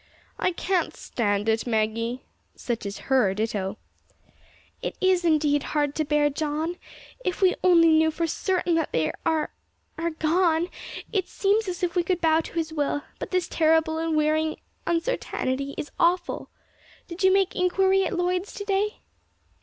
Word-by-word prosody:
"I -, -, +2 dB
can't 365 Hz, +1 st, -1 dB
stand 205 Hz, -2 st, -1 dB
it, 225 Hz, +2 st, +1 dB
Maggie." 230 Hz, +2 st, -1 dB, 0.3 s
(Such 230 Hz, -4 st, -3 dB
is 200 Hz, -, -5 dB
her 245 Hz, -8 st, +3 dB
ditto!) 210 Hz, -2 st, -2 dB, 1.0 s
"It -, -, -4 dB
is, 375 Hz, -2 st, +3 dB
indeed, 300 Hz, -3 st, +3 dB, 0.2 s
hard 290 Hz, -1 st, +1 dB
to 310 Hz, -, 0 dB
bear, 295 Hz, 0 st, +2 dB
John. 310 Hz, +4 st, -2 dB, 0.5 s
If 365 Hz, -, -2 dB
we 375 Hz, -2 st, +4 dB
only 335 Hz, -2 st, +6 dB
knew 315 Hz, 0 st, +5 dB
for 330 Hz, +2 st, -1 dB
certain 355 Hz, +2 st, 0 dB
that 325 Hz, -1 st, 0 dB
they 160 Hz, -1 st, +1 dB, 0.2 s
are 320 Hz, -2 st, +1 dB, 0.5 s
are 335 Hz, +1 st, 0 dB
gone, 330 Hz, +1 st, +1 dB, 0.4 s
it 380 Hz, -4 st, 0 dB
seems 415 Hz, +2 st, +1 dB
as 365 Hz, +1 st, -4 dB
if 350 Hz, 0 st, 0 dB
we 355 Hz, -, +4 dB
could 355 Hz, +1 st, -1 dB
bow 320 Hz, -1 st, +3 dB
to -, -, -10 dB
His 325 Hz, -1 st, -2 dB
will; 290 Hz, -1 st, -1 dB, 0.2 s
but -, -, -5 dB
this 365 Hz, -2 st, 0 dB
terrible 320 Hz, 0 st, +2 dB
and 325 Hz, -1 st, 0 dB
wearing 310 Hz, +1 st, +1 dB, 0.3 s
uncertainty 280 Hz, -, -1 dB
is 295 Hz, -, -5 dB
awful. 350 Hz, +1 st, +1 dB, 0.6 s
Did 345 Hz, +1 st, -8 dB
you 380 Hz, -, +6 dB
make 390 Hz, -1 st, +2 dB
inquiry 380 Hz, +1 st, +3 dB
at -, -, -2 dB
Lloyd's 360 Hz, +2 st, -1 dB
to 405 Hz, -, -5 dB
day?" 405 Hz, +1 st, 0 dB
320 Hz, 160 wpm, -25 LUFS, 290-360 Hz, 1.0 s, only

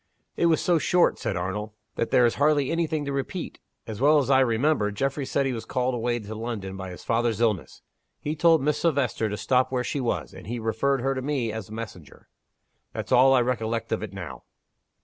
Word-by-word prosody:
"It 170 Hz, -, +2 dB
was 160 Hz, -1 st, +3 dB
so 175 Hz, -2 st, +3 dB
short," 175 Hz, +4 st, +3 dB
said 95 Hz, -, -2 dB
Arnold, 105 Hz, +4 st, -3 dB, 0.2 s
"that 115 Hz, -, -2 dB
there 125 Hz, -, +5 dB
is 115 Hz, -, +2 dB
hardly 145 Hz, -2 st, +3 dB
any 165 Hz, 0 st, +1 dB
thing 150 Hz, -1 st, -2 dB
to 140 Hz, -, -3 dB
repeat. 140 Hz, +6 st, -4 dB, 0.3 s
As 110 Hz, 0 st, -7 dB
well 150 Hz, +2 st, +6 dB
as 140 Hz, -2 st, +1 dB
I 130 Hz, -, +6 dB
remember, 125 Hz, -2 st, +2 dB
Geoffrey 135 Hz, +6 st, -2 dB
said 140 Hz, -, +1 dB
he 135 Hz, -, 0 dB
was 115 Hz, -, -5 dB
called 125 Hz, 0 st, -1 dB
away 120 Hz, 0 st, 0 dB
to 110 Hz, -2 st, -7 dB
London 110 Hz, -4 st, -5 dB
by 95 Hz, -1 st, -6 dB
his 90 Hz, -, -10 dB
father's 115 Hz, -1 st, 0 dB
illness. 110 Hz, -7 st, -1 dB, 0.4 s
He 150 Hz, +1 st, -3 dB
told 165 Hz, -2 st, +4 dB
Miss 150 Hz, +1 st, +1 dB
Silvester 140 Hz, -8 st, +1 dB
to 105 Hz, -, -3 dB
stop 125 Hz, +6 st, +1 dB
where 125 Hz, -1 st, 0 dB
she 140 Hz, -, -2 dB
was; 80 Hz, -, -2 dB
and -, -, -11 dB
he 120 Hz, +2 st, -3 dB
referred 115 Hz, +4 st, 0 dB
her 135 Hz, +2 st, +1 dB
to 130 Hz, -, -3 dB
me, 130 Hz, -5 st, -1 dB
as 110 Hz, -2 st, -6 dB
messenger. 105 Hz, -9 st, -9 dB, 0.6 s
That's -, -, -5 dB
all 135 Hz, +2 st, +6 dB
I 125 Hz, -, +4 dB
recollect 115 Hz, -2 st, -2 dB
of -, -, 0 dB
it 105 Hz, -3 st, -5 dB
now." 85 Hz, -10 st, -8 dB
120 Hz, 220 wpm, -26 LUFS, 110-140 Hz, 0.6 s, well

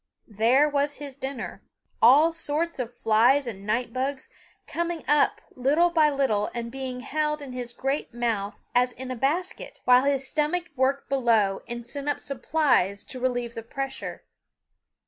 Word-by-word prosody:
There 240 Hz, +8 st, +4 dB
was 285 Hz, 0 st, 0 dB
his 285 Hz, -2 st, -8 dB
dinner, 270 Hz, 0 st, -6 dB, 0.4 s
all 295 Hz, +8 st, +6 dB
sorts 330 Hz, 0 st, 0 dB
of 240 Hz, -2 st, -3 dB
flies 245 Hz, +4 st, +3 dB
and 200 Hz, -4 st, -7 dB
night 230 Hz, +2 st, -1 dB
bugs, 265 Hz, +1 st, -3 dB, 0.4 s
coming 340 Hz, -1 st, -3 dB
up 295 Hz, -1 st, +3 dB
little 295 Hz, +7 st, +3 dB
by 315 Hz, -3 st, +4 dB
little 265 Hz, -8 st, +1 dB
and 235 Hz, -1 st, -4 dB
being 260 Hz, -1 st, -5 dB
held 300 Hz, +3 st, -1 dB
in 280 Hz, -3 st, -8 dB
his 245 Hz, -1 st, -5 dB
great 270 Hz, +2 st, -2 dB
mouth 230 Hz, -4 st, -2 dB
as 245 Hz, 0 st, +3 dB
in 255 Hz, 0 st, -7 dB
a -, -, -3 dB
basket, 310 Hz, +10 st, -2 dB
while 250 Hz, +1 st, +6 dB
his 275 Hz, -1 st, +1 dB
stomach 315 Hz, +5 st, 0 dB
worked 270 Hz, +1 st, +1 dB
below 230 Hz, -7 st, +2 dB
and 240 Hz, 0 st, -6 dB
sent 280 Hz, +4 st, -5 dB
up 290 Hz, -, -1 dB
supplies 250 Hz, -, +1 dB
to 255 Hz, -, -7 dB
relieve 245 Hz, -2 st, -1 dB
the 230 Hz, -, -6 dB
pressure. 270 Hz, +4 st, -5 dB
265 Hz, 160 wpm, -26 LUFS, 240-290 Hz, 0.4 s, all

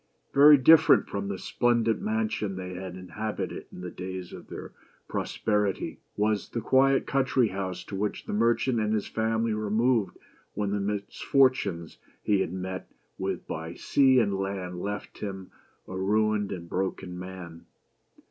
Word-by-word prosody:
Very 145 Hz, +1 st, +9 dB
different 160 Hz, +4 st, +6 dB
from 100 Hz, 0 st, -3 dB
the 100 Hz, -1 st, -3 dB
splendid 120 Hz, +1 st, +1 dB
mansion 215 Hz, -, -1 dB
they 90 Hz, 0 st, -6 dB
had 90 Hz, 0 st, -6 dB
inhab 100 Hz, +4 st, -5 dB
ited -, -, -4 dB
in -, -, -9 dB
the 90 Hz, -1 st, -6 dB
days 90 Hz, 0 st, -6 dB
of -, -, -10 dB
their -, -, -8 dB, 0.4 s
prosperity, 105 Hz, -3 st, -1 dB, 0.2 s
was 105 Hz, 0 st, 0 dB
the 115 Hz, -, -3 dB
quiet 135 Hz, +4 st, +3 dB
country 130 Hz, -4 st, +2 dB
house 95 Hz, -2 st, -4 dB
to 100 Hz, -, -7 dB
which 105 Hz, +2 st, -2 dB
the -, -, -4 dB
merchant 115 Hz, +2 st, +2 dB
and 110 Hz, 0 st, +1 dB
his 105 Hz, -, -1 dB
family 110 Hz, 0 st, 0 dB
removed 110 Hz, +1 st, +1 dB, 0.4 s
when 100 Hz, -1 st, -1 dB
the 105 Hz, -, 0 dB
misfortunes 100 Hz, -, 0 dB, 0.2 s
he 105 Hz, -2 st, +2 dB
had 85 Hz, -, -1 dB
met 95 Hz, 0 st, -5 dB, 0.3 s
with -, -, -3 dB
by 80 Hz, +2 st, -5 dB
sea 135 Hz, -2 st, +4 dB
and 100 Hz, -4 st, +1 dB
land 95 Hz, -2 st, -3 dB
left 105 Hz, 0 st, -5 dB
him 105 Hz, -, -3 dB
a -, -, -8 dB
BEAUTY -, -, -7 dB
AND 95 Hz, -1 st, -11 dB, 0.4 s
THE -, -, -9 dB
BEAST. 95 Hz, +1 st, -1 dB
ruined 105 Hz, -1 st, +2 dB
and 85 Hz, -2 st, -6 dB
broken 90 Hz, 0 st, -3 dB
man. 90 Hz, -3 st, -9 dB
105 Hz, 165 wpm, -27 LUFS, 95-115 Hz, 0.4 s, Very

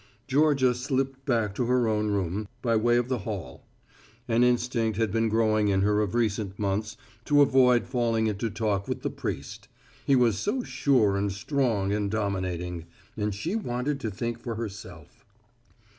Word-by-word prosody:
Georgia 140 Hz, -2 st, +3 dB
slipped 135 Hz, +1 st, -2 dB
back 115 Hz, -6 st, +1 dB
to 120 Hz, -, -1 dB
her 125 Hz, -1 st, +2 dB
own 105 Hz, -1 st, 0 dB
room, 100 Hz, +1 st, -2 dB, 0.2 s
by 115 Hz, -2 st, +2 dB
way 120 Hz, +2 st, +3 dB
of 120 Hz, 0 st, 0 dB
the 130 Hz, -2 st, -1 dB
hall. 95 Hz, -, -6 dB, 0.7 s
An 120 Hz, 0 st, +3 dB
instinct 120 Hz, -3 st, +1 dB
has 110 Hz, -1 st, +1 dB
been 115 Hz, +2 st, +1 dB
growing 110 Hz, -1 st, +2 dB
in 95 Hz, -1 st, +2 dB
her 105 Hz, +1 st, +2 dB
of 105 Hz, +1 st, -2 dB
recent 105 Hz, -4 st, -1 dB
months 105 Hz, +2 st, -2 dB, 0.3 s
to 145 Hz, -1 st, +5 dB
avoid 125 Hz, -3 st, +4 dB
falling 120 Hz, -3 st, 0 dB
into 110 Hz, +1 st, -1 dB
talk 105 Hz, -2 st, -1 dB
with -, -, -4 dB
the -, -, -1 dB
priest. -, -, -6 dB, 0.4 s
He 140 Hz, -, +3 dB
was 115 Hz, -6 st, +3 dB
so 250 Hz, -, -1 dB
sure 120 Hz, -, +2 dB
and 100 Hz, 0 st, 0 dB
strong 105 Hz, -3 st, 0 dB
and 105 Hz, -1 st, -1 dB
dominating; 90 Hz, -5 st, -3 dB, 0.3 s
and 105 Hz, -2 st, -2 dB
she 165 Hz, -, -3 dB
wanted 135 Hz, -, -2 dB
to 115 Hz, -, -3 dB
think 115 Hz, +3 st, -4 dB
for 115 Hz, -1 st, -5 dB
herself. 105 Hz, -3 st, -8 dB
115 Hz, 170 wpm, -27 LUFS, 100-125 Hz, 0.7 s, to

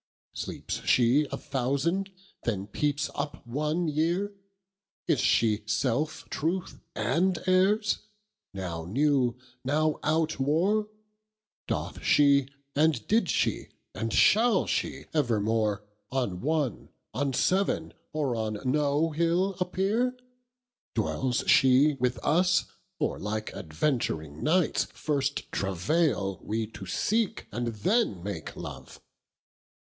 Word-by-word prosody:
Sleepes -, -, -5 dB
she 130 Hz, +5 st, +4 dB
a -, -, -2 dB
thousand, 145 Hz, +9 st, -1 dB, 0.3 s
then 100 Hz, -5 st, -1 dB
peepes 145 Hz, +7 st, -1 dB
up 145 Hz, -3 st, -5 dB
one 150 Hz, +7 st, -1 dB
yeare? 170 Hz, +7 st, 0 dB, 0.8 s
Is -, -, +2 dB
she 110 Hz, -2 st, +3 dB
selfe 130 Hz, +7 st, -1 dB
truth 170 Hz, +4 st, -2 dB, 0.2 s
and 180 Hz, +1 st, +1 dB
errs? 195 Hz, +3 st, +3 dB, 0.5 s
now 90 Hz, -4 st, -5 dB
new, 130 Hz, -, +2 dB, 0.3 s
now 155 Hz, +3 st, +1 dB
outwore? 160 Hz, +6 st, +1 dB, 0.8 s
Doth -, -, -3 dB
she, 140 Hz, -2 st, +5 dB, 0.3 s
and 150 Hz, -6 st, +2 dB
did 220 Hz, -4 st, +2 dB
she, -, -, 0 dB, 0.3 s
and 115 Hz, 0 st, -3 dB
shall 220 Hz, -, +4 dB
she -, -, -2 dB
evermore 110 Hz, -6 st, +1 dB, 0.3 s
On 120 Hz, -9 st, -1 dB
one, 150 Hz, -4 st, -1 dB, 0.2 s
on 140 Hz, +1 st, 0 dB
seaven, 190 Hz, +9 st, +1 dB, 0.2 s
or 145 Hz, -5 st, -1 dB
on 110 Hz, -2 st, -2 dB
no 145 Hz, +4 st, +2 dB
hill 170 Hz, +5 st, +1 dB
appeare? 205 Hz, +8 st, 0 dB, 0.8 s
Dwells 130 Hz, -2 st, 0 dB
she 135 Hz, +3 st, +5 dB
with 125 Hz, -1 st, +1 dB
us, 180 Hz, +3 st, +3 dB, 0.3 s
or -, -, -1 dB
like 110 Hz, +1 st, -3 dB
adventuring 80 Hz, -, -2 dB
knights 165 Hz, +2 st, +2 dB
First 140 Hz, -2 st, -2 dB
travaile 100 Hz, -, 0 dB
we 110 Hz, +1 st, -1 dB
to 95 Hz, -, -9 dB
seek 215 Hz, -, 0 dB
and 120 Hz, 0 st, -2 dB
then 115 Hz, -, 0 dB
make 95 Hz, -6 st, -5 dB
Love? -, -, -9 dB
145 Hz, 110 wpm, -28 LUFS, 115-170 Hz, 0.8 s, she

